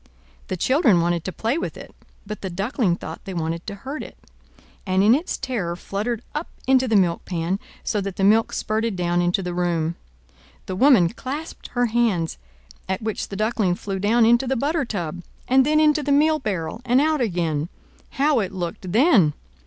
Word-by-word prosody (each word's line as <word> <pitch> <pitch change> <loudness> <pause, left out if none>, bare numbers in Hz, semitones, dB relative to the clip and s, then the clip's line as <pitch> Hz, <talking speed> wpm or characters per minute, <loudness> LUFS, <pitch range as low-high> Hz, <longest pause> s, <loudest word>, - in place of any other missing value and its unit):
The 185 - -3
children 255 - +3
wanted 170 -1 0
to 185 - -2
play 230 - -1
with - - -4
it; - - -11 0.3
but 210 +1 -7
the 190 - -4
Duckling 195 +1 0
thought - - -8
they 190 -2 -6
wanted 165 +1 -3
to 200 - -4
hurt 280 +3 -4
it, - - -10 0.7
and 190 0 +2
in 215 +3 +6
its 310 +7 -1
terror 195 -10 -3
fluttered 215 +6 -3
up 300 +3 -3 0.2
into 260 0 +3
the 225 - +1
milk 175 -4 +2
pan, 175 +2 -2 0.2
so 210 - -1
that 195 -1 -4
the 195 - -2
milk 220 +3 +4
spurted 220 0 -1
down 175 -1 +1
into 175 +2 +1
the 180 0 -3
room. 170 -2 0 0.7
The 185 - -4
woman 220 -6 +5
clasped 280 - -6
her 245 0 +2
hands, 220 - 0 0.5
at 190 +3 -2
which 220 -1 -3
the 200 - -7
Duckling 215 -3 +1
flew 195 +1 -4
down 225 +4 +3
into 240 +3 +4
the 265 - +1
butter 285 +4 0
tub, 175 -6 -4 0.3
and 260 +2 +4
then 305 0 +3
into 305 -1 +4
the 285 - -1
meal 310 +2 +4
barrel 200 - -3
and 250 +1 +3
out 305 0 +2
again. 170 -7 -1 0.4
How 280 -1 +2
it 195 -4 -2
looked 180 0 -5
then! 215 - +5
210 Hz, 190 wpm, -23 LUFS, 180-255 Hz, 0.7 s, in